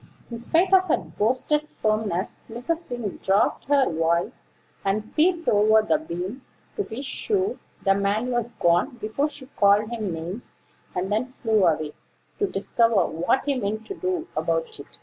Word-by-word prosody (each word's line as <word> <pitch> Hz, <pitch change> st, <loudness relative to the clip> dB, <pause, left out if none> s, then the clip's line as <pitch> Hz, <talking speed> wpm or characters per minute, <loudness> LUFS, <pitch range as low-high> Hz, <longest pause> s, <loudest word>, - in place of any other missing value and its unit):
In 230 Hz, -, -5 dB
spite 345 Hz, +10 st, +2 dB
of 375 Hz, 0 st, +6 dB
her -, -, +3 dB
boasted 245 Hz, -, 0 dB
firmness, 215 Hz, -4 st, -1 dB
Mrs. 275 Hz, +9 st, -3 dB
Wing 240 Hz, -5 st, -4 dB
dropped 195 Hz, +2 st, +2 dB
her 280 Hz, -1 st, +4 dB
voice, 165 Hz, +1 st, 0 dB, 0.4 s
and 210 Hz, +2 st, -2 dB
peeped 335 Hz, +1 st, +2 dB
over 215 Hz, +1 st, +5 dB
the 300 Hz, +8 st, +2 dB
beam, 195 Hz, -, -5 dB, 0.3 s
to -, -, -1 dB
be 245 Hz, -, -6 dB
sure 405 Hz, -, -1 dB, 0.2 s
the 195 Hz, -, +4 dB
man 200 Hz, +5 st, 0 dB
was 240 Hz, -1 st, -1 dB
gone 175 Hz, -, +2 dB
before 235 Hz, +8 st, -1 dB
she 290 Hz, -2 st, -10 dB
called 210 Hz, -4 st, +3 dB
him 215 Hz, -5 st, -2 dB
names; 170 Hz, +8 st, -6 dB, 0.4 s
and 185 Hz, +2 st, -2 dB
then 220 Hz, +4 st, +1 dB
flew 220 Hz, -6 st, +1 dB
away, 155 Hz, -2 st, 0 dB, 0.5 s
to 405 Hz, -, +2 dB
discover 205 Hz, -, +2 dB
what 175 Hz, +11 st, 0 dB
he 285 Hz, -, +2 dB
meant 215 Hz, -3 st, -2 dB
to -, -, -5 dB
do 370 Hz, -2 st, -2 dB
about 485 Hz, -3 st, -1 dB
it. -, -, -12 dB
225 Hz, 165 wpm, -25 LUFS, 200-290 Hz, 0.5 s, of